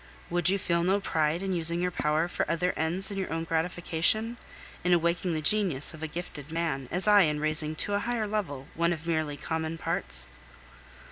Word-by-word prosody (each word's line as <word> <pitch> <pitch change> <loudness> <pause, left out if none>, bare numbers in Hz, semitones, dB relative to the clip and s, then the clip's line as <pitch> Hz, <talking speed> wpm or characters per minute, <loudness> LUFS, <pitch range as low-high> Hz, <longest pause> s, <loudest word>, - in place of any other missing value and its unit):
Would 175 0 +3
you 195 - +3
feel 170 -3 0
no 190 +3 +3
pride 160 -2 0
in 190 -1 -1
using 170 0 0
your 180 0 0
power 155 0 +1
for - - -2
other 180 +2 +1
ends 170 +5 -1
than 200 -1 -4
your 190 - -3
own 165 0 -1
gratification, 175 +7 0 0.5
in 180 0 +3
awakening 170 0 +1
the 155 - -3
genius 175 -8 +3
of 155 - -11
a 160 - -2
gifted 155 -2 -7
man, 160 -6 -2
as 180 +3 +1
I 205 -1 +7
in 150 -4 +2
raising 155 0 -1
to 205 - -3
a 200 - +2
higher 230 0 -1
level 185 -11 -3
one 170 +1 +1
of 160 -1 -8
merely 155 -3 -1
common 160 +1 -3
parts? 65 - 0
170 Hz, 200 wpm, -28 LUFS, 155-185 Hz, 0.5 s, I